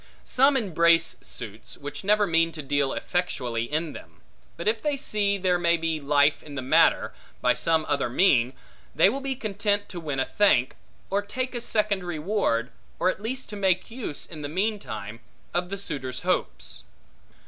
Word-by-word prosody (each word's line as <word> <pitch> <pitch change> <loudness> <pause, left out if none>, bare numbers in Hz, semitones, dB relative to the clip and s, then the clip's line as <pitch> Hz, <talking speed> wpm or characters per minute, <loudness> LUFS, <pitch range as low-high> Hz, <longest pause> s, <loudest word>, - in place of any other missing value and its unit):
Some 270 +2 +4
embrace 170 -6 +3
suits, 110 -2 -7
which 145 +3 -7
never 210 +1 +3
mean 165 -2 +2
to 155 - -6
deal 140 0 +1
effectually 125 -10 -2
in 155 +1 -1
them; - - -13 0.4
but 170 - -4
if 220 +1 +2
they 295 -2 0
see 205 -6 +1
there 180 -2 +1
may 170 -1 +3
be 165 -1 -1
life 145 +1 +3
in 145 -2 -10
the 130 - -3
matter, 130 - +3 0.3
by - - +3
some 160 -1 +1
other 140 -4 0
mean, 125 -4 +3 0.4
they 165 +5 +6
will 265 +6 -2
be 270 -1 -2
content 205 -3 -1
to 180 - -6
win 145 -5 -3
a 130 - +2
thank, 135 -12 +3 0.4
or 200 +1 +2
take 255 +6 -4
a 240 - -3
second 210 -4 0
reward, 160 - -1 0.3
or 185 - +2
at 190 - -10
least 260 +4 -3
to 210 - -6
make 190 0 +1
use, 225 - -6
in 155 -2 -10
the 145 - -4
meantime, 150 - -3 0.3
of 175 0 -1
the 200 - -4
suitor's 130 -9 -4
hopes. - - -2
170 Hz, 180 wpm, -26 LUFS, 145-205 Hz, 0.4 s, they